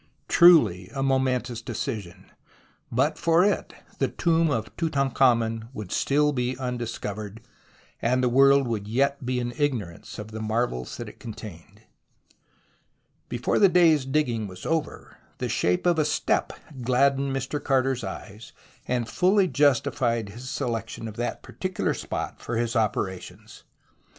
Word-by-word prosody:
Truly 115 - +6
a 135 - -1
momentous 130 -3 0
decision. 105 -6 -6 0.6
But - - +1
for 170 +2 +4
it 205 - -1 0.2
the - - +2
tomb 165 -1 +1
of 110 -6 -3
Tutankhamen 125 -7 +1
would 105 -3 -7
still 150 +1 +2
be 125 -1 -1
undiscovered, 115 -4 -5 0.6
and 125 +2 +1
the - - +3
world 135 +2 +5
would 105 -3 -3
yet 140 +5 0
be 125 0 -1
in 120 0 -3
ignorance 115 - -2
of 105 0 -8
the 110 0 -6
marvels 110 - -2
that - - -6
it - - -12
contained. 105 -7 -10 1.5
Before 120 0 0
the 200 - +6
day's 165 -5 +5
digging 130 -6 0
was 90 -1 -10
over, 160 -1 -3 0.2
the - - -2
shape 90 - +1
of 175 -2 +3
a - - +4
step 155 - 0 0.3
gladdened 135 +3 +2
Mr. 135 +2 -3
Carter's 130 -2 +1
eyes, 100 +3 -8 0.3
and 120 -2 -1
fully 190 - +3
justified 130 - +1
his 120 +5 -9
selection 115 -5 -3
of 105 - -8
that 120 +1 -3
par 120 - -13
ticular 185 -1 -1
spot - - -5
for 115 - -3
his 120 +1 -1
operations. 100 -4 -3
125 Hz, 140 wpm, -25 LUFS, 110-140 Hz, 1.5 s, Truly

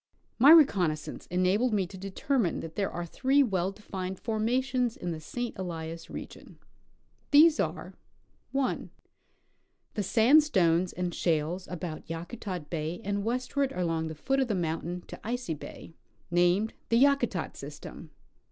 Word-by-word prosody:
My 270 +5 +8
reconnoissance 185 - +4
enabled 185 +7 +2
ixie 190 - +1
to 195 - -10
determine 195 - -1
that 160 0 -8
there 200 -1 0
are 175 0 -4
three 270 +10 +3
well 190 -6 0
defined 190 -2 -6
formations 245 +3 0
in 175 - -4
the 160 - -4
St. 240 +10 -5
Elias 165 -2 -5
region. - - -9 0.7
These 310 +2 +7
are - - -2 0.3
— - - -41
1. 270 -1 -1 1.0
The 210 - -1
sandstones 205 - +4
and 180 -1 -3
shales 165 +3 -1
about 175 -3 -6
Yakutat 175 0 -6
bay 165 +1 -3
and 200 0 -1
west 250 +5 -2
ward 280 -1 +2
along 165 -3 -1
the 160 - -6
foot 270 - 0
of 265 - +2
the 215 - 0
mountain 170 +1 -2
to - - -10
Icy 245 -5 -2
bay, 155 +2 -10 0.4
named 175 +5 +3 0.2
the 230 - +4
Ya 280 +3 +6
kutat 275 - -3
system. - - -9
2. - - -20
190 Hz, 150 wpm, -29 LUFS, 170-245 Hz, 1.0 s, My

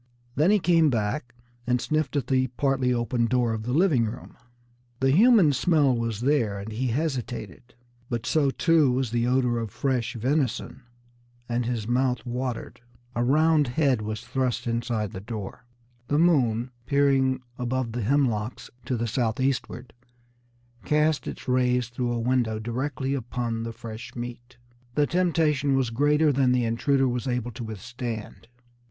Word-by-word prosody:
Then 150 +7 +3
he 210 - +5
came 165 -4 +3
back 120 +2 -2 0.3
and 125 0 +2
sniffed 155 0 -1
at 140 - 0
the 130 -1 +1
partly 130 0 0
open 120 0 0
door 120 -2 +1
of 110 - -3
the 120 +3 -4
living 150 -5 +3
room. 110 - -7 0.6
The 135 0 +3
human 200 - +6
smell 140 -1 +3
was 115 -2 -2
there, 120 -7 +1
and 100 +3 -7
he 125 +4 -2
hesitated. 125 - -4 0.3
But 120 0 -3
so, 145 -1 +2
too, 155 -1 +3
was 125 -2 -1
the 120 0 +1
odor 125 -2 +2
of 115 -2 -4
fresh 125 +1 -1
venison, 130 +2 -1 0.7
and 120 0 -1
his 115 -3 -2
mouth 125 0 0
watered. 125 -1 -4 0.3
A 120 - +1
round 155 +3 +3
head 130 -2 +1
was 110 0 -4
thrust 130 -1 -2
inside 115 -3 -2
the 95 - -6
door. 110 +2 -7 0.4
The 145 - +1
moon, 130 -8 +2 0.2
peering 135 -2 +2 0.2
above 125 -1 -1
the 120 +1 -3
hemlocks 120 -2 0
to 125 - -1
the 115 - -1
southeastward, 125 +2 -2 0.9
cast 150 0 +1
its - - -7
rays 125 -1 +1
through 120 0 -2
a 120 - -1
window 120 -2 +1
directly 130 +4 -3
upon 120 -3 -3
the 115 0 -4
fresh 115 -1 -9
meat. 120 +1 -8 0.4
The 150 - +3
temptation 155 -5 +1
was 130 -4 0
greater 145 +5 +3
than 130 -2 +2
the 125 -1 +1
intruder 135 +4 +1
was 125 0 -2
able 125 -1 -2
to 120 +2 -7
withstand. 115 +1 -6
125 Hz, 155 wpm, -26 LUFS, 115-140 Hz, 0.9 s, human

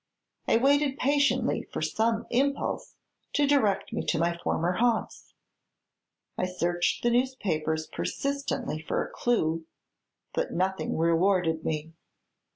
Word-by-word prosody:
I - - +4
waited 280 +2 +3
patiently 285 +1 +2
for - - -5
some 225 +1 0
impulse 275 +3 0 0.4
to 290 - +3
direct 215 -9 +2
me - - -1
to 170 - +1
my 170 +1 +1
former 170 0 0
haunts. 235 -1 -1 1.0
I 185 - +1
searched 175 -1 0
the 240 - +3
newspapers 180 -12 0
persistently 275 - -3
for 155 - -1
a - - -11
clue; 165 -9 0 0.7
but - - -1
nothing 190 +2 -1
rewarded 165 0 +2
me. 160 +1 -3
195 Hz, 120 wpm, -28 LUFS, 165-260 Hz, 1.0 s, I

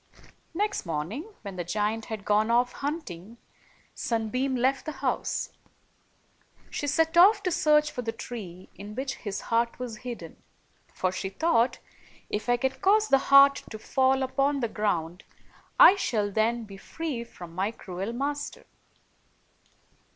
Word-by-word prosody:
Next 410 +3 -1
morning, 180 - -4
when 195 -3 -7
the 175 - -2
giant 210 +5 -1
had 215 -3 -6
gone 210 +2 +2
off 245 +1 +3
hunting, 235 - -6 0.6
Sunbeam 250 +4 -1
left 265 +4 0
the 310 - -3
house. 265 -1 -2 1.2
She 290 - -3
set 325 +3 +1
off 400 +4 +7
to 365 - 0
search 300 -2 +3
for 250 - -4
the 225 -2 -3
tree 190 -7 -8
in 205 +2 -10
which 265 +1 -3
his 205 -3 -5
heart 235 0 +1
was 245 -3 -6
hid 245 0 -6
den; - - -11 0.5
for 185 - -1
she 190 +1 -4
thought, 240 - +2 0.3
" - - -27
If 215 +3 -3
I 245 - +4
can 265 +2 0
cause 425 +2 +3
the 270 - +5
heart 275 0 +8
to 220 - -7
fall 265 +4 +1
upon 275 +2 +1
the 235 - +1
ground, 180 -5 -2 0.6
I - - +10
shall 210 - 0
then 225 +3 +1
be 200 -2 -11
free 285 +3 -5
from 175 -7 -12
my 190 +4 0
cruel 195 -1 -6
master." 285 +4 -4
235 Hz, 155 wpm, -27 LUFS, 205-275 Hz, 1.2 s, I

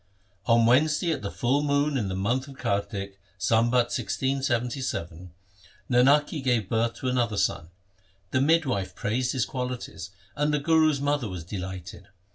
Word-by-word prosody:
On 115 -1 +5
Wednesday 155 +7 +3
at 160 - -2
the 100 - -4
full 130 +7 0
moon 145 0 +1
in 110 -7 0
the 95 - -3
month 120 +8 -1
of 135 -1 -12
Kartik, 100 -2 -3 0.2
Sambat 120 +4 +2
1677, 120 - -2 0.6
Nanaki 140 +5 +4
gave 120 -6 +1
birth 115 0 0
to 130 - -5
another 120 -4 0
son. 85 - 0 0.6
The 130 - +2
midwife 140 - +1
praised 125 +3 -1
his 130 -4 0
qualities, 125 -7 -5 0.3
and 150 0 +1
the 150 - +2
Guru's 155 -1 +3
mother 145 -4 0
was 90 -3 -6
delighted. 90 -1 -7
125 Hz, 145 wpm, -26 LUFS, 105-140 Hz, 0.6 s, On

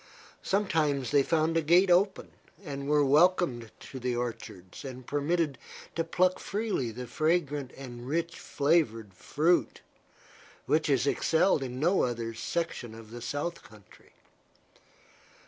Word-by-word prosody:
Sometimes 155 -9 0
they 145 -1 +5
found 160 +3 +1
a 165 - +3
gate 175 +4 +4
open, 190 +2 +2 0.3
and 140 -1 -5
were 150 -1 +4
welcomed 145 -5 +3
to 130 - -8
the 125 0 -1
orchards 110 -6 -6
and 130 -2 -8
permitted 145 -1 -1 0.4
to 165 - 0
pluck 180 +3 +1
freely 200 - -2
the 125 +3 -7
fragrant 150 0 0
and 120 -2 -9
rich 165 +3 -2
flavored 140 - 0
fruit, 160 - 0 0.8
which 155 0 +1
is 135 -1 +2
excelled 160 +3 +2
in 125 -1 -5
no 175 +6 +3
other 115 -2 -2
section 120 -3 -4
of 115 -1 -12
the 120 0 -8
south 145 +7 -3
country. 105 -3 -19
145 Hz, 130 wpm, -29 LUFS, 125-170 Hz, 0.8 s, they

